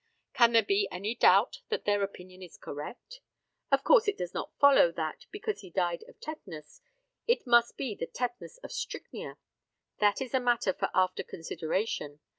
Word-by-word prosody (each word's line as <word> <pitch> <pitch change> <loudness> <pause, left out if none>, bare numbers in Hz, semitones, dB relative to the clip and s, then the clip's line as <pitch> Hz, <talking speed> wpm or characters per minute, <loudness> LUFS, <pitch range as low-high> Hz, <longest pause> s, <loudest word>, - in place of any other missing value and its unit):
Can 235 -1 +5
there 225 -1 +6
be 200 0 +1
any 200 +5 -3
doubt 485 - +4
that 450 - -2
their 205 0 +2
opinion 185 -2 -6
is 180 -3 -11
correct? 240 - -8 0.5
Of 275 0 +3
course - - +5
it 410 - 0
does 175 0 -5
not - - -4
follow 280 -11 +6
that, 160 -2 -5
because 425 +1 -4
he 190 - -11
died 175 -1 -1
of - - -17
tetanus, 165 - -9 0.5
it 475 - +2
must 235 -1 +4
be 255 -6 -3
the 165 - -5
tetanus 245 - -5
of - - -8
strychnia. - - -6 0.6
That 205 -1 +3
is 265 -1 -5
a 260 - +3
matter 240 -6 +1
for - - -2
after 185 0 +2
consideration. 160 -2 -3
205 Hz, 175 wpm, -30 LUFS, 180-255 Hz, 0.6 s, there